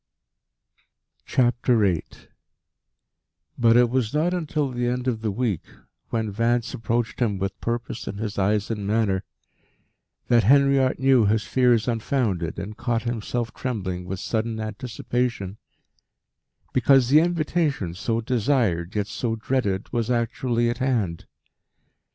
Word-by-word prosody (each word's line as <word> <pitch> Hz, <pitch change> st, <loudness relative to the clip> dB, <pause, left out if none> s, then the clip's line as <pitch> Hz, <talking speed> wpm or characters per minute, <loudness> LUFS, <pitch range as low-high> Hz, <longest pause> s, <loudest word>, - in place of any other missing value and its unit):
VIII 120 Hz, -, +2 dB, 1.5 s
But 115 Hz, -1 st, +4 dB
it 120 Hz, -1 st, +5 dB
was 125 Hz, -1 st, 0 dB
not 165 Hz, +4 st, +2 dB
until 155 Hz, -5 st, -1 dB
the 120 Hz, 0 st, -1 dB
end 125 Hz, +1 st, -2 dB
of 115 Hz, -3 st, -1 dB
the 110 Hz, -, -1 dB
week, 105 Hz, -3 st, -1 dB, 0.5 s
when 110 Hz, -2 st, -1 dB
Vance 115 Hz, +3 st, 0 dB
approached 115 Hz, +1 st, -2 dB
him 110 Hz, -5 st, +1 dB
with 95 Hz, 0 st, -4 dB
purpose 120 Hz, 0 st, -3 dB
in 100 Hz, -, -4 dB
his 105 Hz, -1 st, -4 dB
eyes 105 Hz, +2 st, +1 dB
and 105 Hz, -3 st, -3 dB
manner, 105 Hz, -3 st, +1 dB, 1.0 s
that 120 Hz, -1 st, +4 dB
Henriot 140 Hz, +2 st, +4 dB
knew 130 Hz, -5 st, +4 dB
his 110 Hz, +1 st, +2 dB
fears 125 Hz, -3 st, +2 dB
unfounded, 110 Hz, -7 st, -1 dB
and 105 Hz, +2 st, -6 dB
caught 120 Hz, -2 st, -1 dB
himself 120 Hz, 0 st, -3 dB
trembling 95 Hz, -8 st, -4 dB
with 95 Hz, +1 st, -5 dB
sudden 110 Hz, +1 st, -2 dB
anticipation 110 Hz, -1 st, -3 dB, 1.1 s
because 130 Hz, 0 st, +4 dB
the 150 Hz, +3 st, +7 dB
invitation, 155 Hz, -, 0 dB
so 115 Hz, +5 st, -1 dB
desired 110 Hz, -7 st, 0 dB
yet 105 Hz, -1 st, 0 dB
so 115 Hz, +2 st, -2 dB
dreaded, 110 Hz, -5 st, -2 dB
was 120 Hz, -1 st, 0 dB
actually 120 Hz, 0 st, 0 dB
at 120 Hz, +1 st, -2 dB
hand. 115 Hz, -11 st, -1 dB
115 Hz, 125 wpm, -24 LUFS, 105-125 Hz, 1.5 s, the